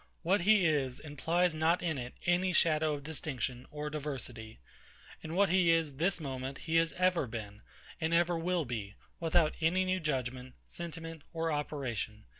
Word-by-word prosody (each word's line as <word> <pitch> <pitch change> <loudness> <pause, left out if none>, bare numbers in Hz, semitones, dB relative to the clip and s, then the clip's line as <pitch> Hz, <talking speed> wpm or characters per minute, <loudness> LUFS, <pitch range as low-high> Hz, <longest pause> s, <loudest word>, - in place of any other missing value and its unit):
What 185 +3 +3
he 205 0 +5
is 135 -5 +1
implies 165 +4 0
not 160 +3 +2
in 160 -5 -1
it 125 0 -6
any 180 +1 +2
shadow 155 -2 +3
of 140 - -8
distinction 130 -4 -3
or 150 0 -5
diversity. 130 -7 -6 0.6
And 160 +1 -5
what 200 0 +4
he 180 -1 +4
is 165 -4 +2
this 175 +4 +1
moment 135 -2 -4
he 165 0 +2
ever 180 +2 +2
has - - -11
been, 105 -2 -7 0.4
and 160 +1 0
ever 175 +1 +3
will 170 0 0
be, 105 -5 -5 0.2
without 165 -1 +3
any 180 +4 +3
new 185 0 +1
judgement, 130 -4 -3
sentiment, 165 -2 -7
or 165 0 -1
operation. 125 -8 -3
155 Hz, 165 wpm, -32 LUFS, 130-170 Hz, 0.6 s, he